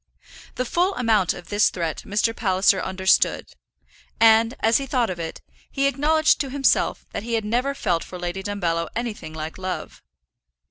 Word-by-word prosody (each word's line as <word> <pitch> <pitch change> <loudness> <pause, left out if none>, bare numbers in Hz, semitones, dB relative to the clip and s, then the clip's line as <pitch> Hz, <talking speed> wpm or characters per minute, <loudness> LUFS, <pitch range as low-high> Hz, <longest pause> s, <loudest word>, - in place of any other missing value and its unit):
The 255 - -2
full 360 +9 0
amount 220 -7 +2
of 175 - -12
this 205 0 +3
threat 165 -3 -4
Mr. 215 +3 0
Palliser 190 -2 +2
understood, 190 0 +1 0.7
and, 225 +1 +5
as 225 +1 +4
he 275 - -4
thought 245 -5 0
of 175 - -6
it, 165 -1 -6 0.3
he 275 0 -1
acknowledged 300 +4 +2
to 275 - -3
himself 270 +1 +1
that - - -4
he 230 +2 -2
had 220 -2 -1
never 250 +6 0
felt 175 -10 -1
for 180 - -9
Lady 175 +2 -4
Dumbello 175 -5 -2
anything 220 -9 -5
like 160 +3 -6
love. 185 -1 -5
210 Hz, 170 wpm, -23 LUFS, 185-250 Hz, 0.7 s, and